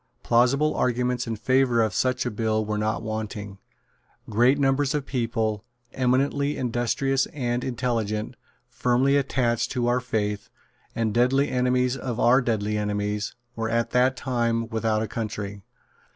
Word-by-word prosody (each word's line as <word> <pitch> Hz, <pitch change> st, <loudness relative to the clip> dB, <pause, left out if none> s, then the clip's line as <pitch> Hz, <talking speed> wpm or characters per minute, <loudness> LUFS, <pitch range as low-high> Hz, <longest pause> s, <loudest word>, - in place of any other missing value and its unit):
Plausible 130 Hz, +6 st, +3 dB
arguments 125 Hz, 0 st, 0 dB
in 115 Hz, -, -2 dB
favour 130 Hz, +1 st, +2 dB
of 110 Hz, -3 st, -1 dB
such 130 Hz, +4 st, 0 dB
a 120 Hz, -, -1 dB
bill 110 Hz, 0 st, 0 dB
were 105 Hz, 0 st, -2 dB
not 110 Hz, +1 st, -1 dB
wanting. 105 Hz, -2 st, -5 dB, 0.7 s
Great 120 Hz, +6 st, +3 dB
numbers 135 Hz, 0 st, +1 dB
of 145 Hz, -2 st, -2 dB
people, 115 Hz, -5 st, -1 dB, 0.3 s
eminently 140 Hz, +3 st, +1 dB
industrious 130 Hz, +2 st, 0 dB
and 125 Hz, -3 st, -2 dB
intelligent, 115 Hz, -3 st, -2 dB, 0.3 s
firmly 125 Hz, +3 st, +2 dB
attached 120 Hz, -4 st, +1 dB
to 125 Hz, -2 st, 0 dB
our 120 Hz, +1 st, +2 dB
faith, 105 Hz, -4 st, -2 dB, 0.5 s
and 110 Hz, -2 st, 0 dB
deadly 130 Hz, +4 st, +3 dB
enemies 125 Hz, 0 st, +1 dB
of 125 Hz, -3 st, -4 dB
our 130 Hz, +3 st, +5 dB
deadly 105 Hz, -3 st, -1 dB
enemies, 105 Hz, 0 st, -2 dB, 0.2 s
were 115 Hz, -1 st, -2 dB
at 115 Hz, 0 st, 0 dB
that 125 Hz, +1 st, +3 dB
time 115 Hz, -3 st, 0 dB
without 110 Hz, -1 st, 0 dB
a -, -, -3 dB
country. 105 Hz, -3 st, -5 dB
120 Hz, 140 wpm, -25 LUFS, 110-130 Hz, 0.7 s, our